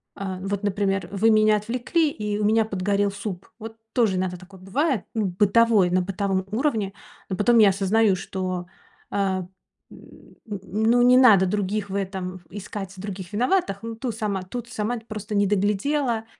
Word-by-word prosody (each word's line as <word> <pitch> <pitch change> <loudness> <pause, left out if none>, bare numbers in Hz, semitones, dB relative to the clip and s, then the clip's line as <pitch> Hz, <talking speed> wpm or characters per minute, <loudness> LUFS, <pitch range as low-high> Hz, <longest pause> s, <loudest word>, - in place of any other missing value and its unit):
а, 190 -2 -5
вот, 200 +1 -3
например, 195 -1 0
вы 210 +3 +2
меня 215 -1 +5
отвлекли, 250 +9 0
и 210 -1 -3
у 210 - 0
меня 220 +1 +3
подгорел 200 0 0
суп. 200 -2 -6
Вот 225 0 -8 0.2
тоже 225 -6 +2
иногда 180 -1 -2
такое 185 +1 -15
бывает, 245 - 0
ну, 220 -2 0
бытовой, 205 +1 +3
на 185 +1 +3
бытовом 190 0 -2
уровне. 220 -5 0 0.4
Но 190 - -1
потом 230 +4 +4
я 210 -2 +7
осознаю, 200 +2 +2
что, 185 -1 -4 0.5
э, - - -2
н 190 -2 0 1.0
н 205 +1 -2
ну, 245 0 +4
не 250 +1 +6
надо 215 -7 +7
других 200 +1 -1
в - - -3
этом 185 -2 -4
искать, 195 0 -7
других 190 -1 -7
виноватых. 240 - +1
Ну, 230 0 -5
ту 235 +1 -3
сама 210 -3 -2
тут 235 +5 -6
сама, 235 0 -2
просто 215 -1 -5
не 205 - +3
доглядела, 220 +5 0
205 Hz, 170 wpm, -24 LUFS, 190-225 Hz, 1.0 s, я